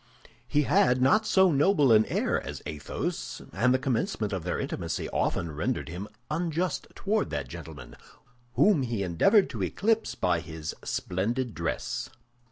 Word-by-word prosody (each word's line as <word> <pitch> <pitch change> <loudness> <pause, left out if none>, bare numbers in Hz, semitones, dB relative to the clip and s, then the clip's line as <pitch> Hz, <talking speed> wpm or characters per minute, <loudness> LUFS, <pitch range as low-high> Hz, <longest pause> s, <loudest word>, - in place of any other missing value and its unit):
He 150 0 +2
had 125 -2 +3
not 180 +13 +4
so 190 -2 +5
noble 145 -2 +4
an 110 -1 +6
air - - 0
as - - -7
Athos, 70 -4 -4
and 115 +8 +3
the 130 - +4
commencement 130 - -1
of 95 -4 -3
their 90 - -2
intimacy - - -3
often 85 -2 -1
rendered 75 0 -2
him 90 +5 -6 0.2
unjust 170 +1 -1
toward 210 +1 0
that 70 -2 -3
gentleman, 70 0 -9 0.6
whom 200 -8 +4
he 115 -5 -2
endeavored 95 - +4
to - - -5
eclipse 225 +2 0
by 90 -2 +1
his 80 -2 -6
splendid 115 +6 -2
dress. 85 -1 -3
120 Hz, 150 wpm, -28 LUFS, -, 0.6 s, an